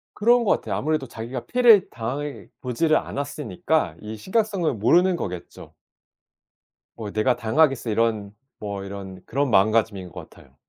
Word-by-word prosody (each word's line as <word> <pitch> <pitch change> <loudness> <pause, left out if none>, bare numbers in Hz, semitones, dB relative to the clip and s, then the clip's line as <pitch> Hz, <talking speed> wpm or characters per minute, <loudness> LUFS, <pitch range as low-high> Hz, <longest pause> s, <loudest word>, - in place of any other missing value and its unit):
그런 235 +3 +4
것 - - +1
같아요. - - 0
아무래도 155 -2 -1
자기가 120 +2 -7
피해를 235 -6 +5
당해보지를 140 +3 -2
않았으니까 150 +3 -2
이 110 +1 -7
심각성을 190 - 0
모르는 175 - +3
거겠죠. 90 - -7 1.2
뭐 110 -3 -6
'내가 110 +4 +1
당하겠어?' 130 +1 +2
이런 110 -2 0 0.3
뭐 100 -2 -5
이런 95 -1 -8
그런 140 +2 -1
마음가짐인 105 -3 +2
것 - - -10
같아요. - - -19
125 Hz, 335 characters per minute, -24 LUFS, 110-160 Hz, 1.2 s, 피해를